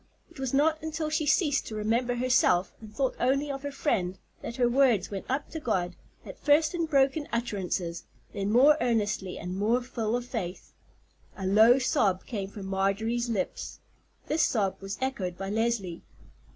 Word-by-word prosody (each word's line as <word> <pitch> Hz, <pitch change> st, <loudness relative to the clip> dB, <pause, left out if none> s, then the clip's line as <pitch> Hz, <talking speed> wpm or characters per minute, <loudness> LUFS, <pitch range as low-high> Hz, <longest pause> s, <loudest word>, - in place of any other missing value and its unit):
It -, -, -14 dB
was 265 Hz, -2 st, -2 dB
not 310 Hz, +3 st, +2 dB
until 315 Hz, 0 st, -3 dB
she 310 Hz, -1 st, 0 dB
ceased 290 Hz, -2 st, +2 dB
to 220 Hz, -, -6 dB
remember 230 Hz, +4 st, 0 dB
herself, 240 Hz, -7 st, +2 dB
and 215 Hz, -1 st, -11 dB
thought 260 Hz, +4 st, -1 dB
only 275 Hz, +3 st, +1 dB
of 275 Hz, -1 st, -5 dB
her 285 Hz, 0 st, -4 dB
friend, 190 Hz, -, -1 dB, 0.2 s
that 235 Hz, -, -6 dB
her 245 Hz, -1 st, +2 dB
words 240 Hz, -6 st, +3 dB
went 195 Hz, -1 st, -5 dB
up 270 Hz, +3 st, -2 dB
to 320 Hz, -, -4 dB
God, 185 Hz, -, -1 dB, 0.3 s
at -, -, -10 dB
first 305 Hz, +2 st, +3 dB
in 335 Hz, -2 st, -1 dB
broken 280 Hz, 0 st, +2 dB
utterances, 190 Hz, -7 st, -2 dB, 0.3 s
then 200 Hz, 0 st, -2 dB
more 280 Hz, +6 st, +6 dB
earnestly 210 Hz, -6 st, 0 dB
and 180 Hz, +2 st, -5 dB
more 215 Hz, +5 st, +2 dB
full 240 Hz, -3 st, -2 dB
of 245 Hz, 0 st, -2 dB
faith. 195 Hz, -8 st, -5 dB, 0.6 s
A 190 Hz, -, -4 dB
low 220 Hz, +6 st, +6 dB
sob 230 Hz, -, +1 dB
came 200 Hz, -5 st, -4 dB
from 200 Hz, -1 st, -8 dB
Marjorie's 200 Hz, +5 st, 0 dB
lips. 215 Hz, -5 st, -3 dB, 0.5 s
This 310 Hz, +2 st, 0 dB
sob 200 Hz, -9 st, +1 dB
was 195 Hz, +1 st, -5 dB
echoed 195 Hz, -10 st, -2 dB
by 195 Hz, +1 st, -4 dB
Leslie. 220 Hz, -6 st, -1 dB
235 Hz, 175 wpm, -28 LUFS, 195-270 Hz, 0.6 s, more